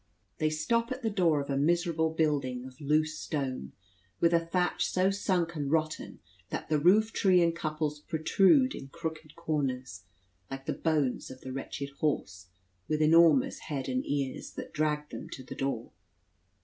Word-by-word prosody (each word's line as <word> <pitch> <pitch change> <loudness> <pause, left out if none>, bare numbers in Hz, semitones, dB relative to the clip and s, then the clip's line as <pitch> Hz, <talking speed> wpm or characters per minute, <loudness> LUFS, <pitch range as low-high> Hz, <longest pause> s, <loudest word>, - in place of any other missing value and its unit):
They 155 - +2
stop 230 +11 0
at 255 0 -4
the 225 - 0
door 170 -7 +3
of 140 - -5
a - - 0
miserable 165 +2 +2
building 145 -6 0
of 130 +2 -12
loose 155 +2 +1
stone, 130 - -3 0.5
with 170 0 +3
a 170 - +6
thatch 180 +1 0
so 185 +1 +2
sunk 185 -4 0
and 145 -2 -2
rotten, 155 0 -1 0.3
that - - -5
the 155 -1 +2
roof 210 +8 +4
tree 185 -3 +4
and 170 0 +1
couples 155 -2 -2
protrude 190 - +3
in 135 - -8
crooked 160 0 -6
corners, 130 - -3 0.4
like 135 0 -7
the - - -1
bones 150 -6 0
of 130 0 -11
the 130 - -6
wretched 140 +1 -5
horse, 100 - -2 0.4
with 155 0 0
enormous 155 -3 +5
head 140 -4 -4
and 130 -1 -1
ears, 140 -2 -2
that - - -8
dragged 150 -1 -1
them - - -7
to 130 - -8
the - - -8
door. 135 -4 -3
155 Hz, 170 wpm, -30 LUFS, 140-170 Hz, 0.5 s, a